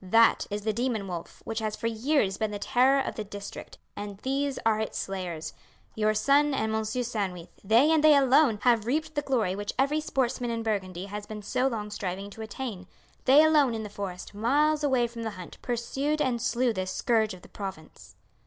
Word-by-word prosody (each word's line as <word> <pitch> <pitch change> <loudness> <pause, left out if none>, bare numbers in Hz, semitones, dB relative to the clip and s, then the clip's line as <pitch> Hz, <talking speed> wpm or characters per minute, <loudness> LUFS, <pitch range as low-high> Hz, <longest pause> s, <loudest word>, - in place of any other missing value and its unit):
That 225 +5 +4
is 205 0 -4
the 215 0 0
demon 230 -3 -1
wolf 175 -2 -7
which 225 0 -3
has 215 -1 -2
for - - -7
years 230 -2 +1
been 220 +1 -1
the 205 - -4
terror 260 +5 +3
of - - -4
the 215 - -4
district, 200 0 -9 0.2
and 205 -1 -6
these 275 +1 -1
are 220 -1 +3
its 220 - -3
slayers. 175 -5 -4 0.4
Your 215 0 +1
son 280 +6 +3
and 220 -3 -1
M. 220 0 0
Sandwith, 210 -7 -3
they, 230 +9 +5
and 315 -2 +3
they 305 -1 +8
alone, 270 -3 +5
have 230 -3 +3
reaped 310 +4 -1
the 290 - 0
glory 235 -10 0
which 205 +1 -4
every 285 +3 +2
sportsman 250 -4 -1
in 230 -1 -2
Burgundy 190 -4 -2
has 205 +1 -7
been 215 -1 -7
so 255 +5 +1
long 210 -5 -3
striving 195 0 -4
to 225 - -9
attain; 220 -4 -6 0.4
they 280 +4 +7
alone 295 -6 +4
in 220 - -4
the 210 - -6
forest, 195 -2 -6
miles 295 +8 +2
away 260 -4 +3
from 235 0 -7
the 225 - -2
hunt, 180 - -10
pursued 270 +5 -1
and 245 -5 0
slew 245 +1 +1
this 185 -2 -3
scourge 220 -4 +1
of 180 - -16
the - - -13
province." 155 - -9
225 Hz, 205 wpm, -28 LUFS, 205-265 Hz, 0.4 s, they